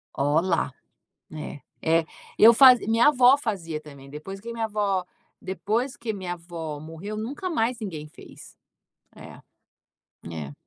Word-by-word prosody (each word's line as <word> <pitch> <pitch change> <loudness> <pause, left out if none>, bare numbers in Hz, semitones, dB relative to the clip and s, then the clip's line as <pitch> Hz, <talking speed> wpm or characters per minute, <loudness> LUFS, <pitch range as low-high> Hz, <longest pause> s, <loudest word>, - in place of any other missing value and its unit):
Ó 145 +3 +2
lá, 185 - 0 0.6
é, 150 -2 -7 0.2
é. 165 0 +2 0.3
Eu 230 +2 +9
fazi 255 -3 +7
minha 230 +5 +4
avó 260 -1 +6
fazia 175 - -4
também, 140 -2 -13
depois 175 +7 -8
que 235 +3 -8
minha 225 -1 -2
avó 200 -4 -1 0.4
depois 220 +7 -2
que 225 -2 -4
minha 185 -3 -4
avó 165 -3 -7
morreu 165 +7 -7
nunca 280 - -4
mais 240 -6 0
ninguém 160 -8 -6
fez. - - -15 0.6
É, - - -12 0.9
é. 75 -3 -6
195 Hz, 140 wpm, -25 LUFS, 160-230 Hz, 0.9 s, Eu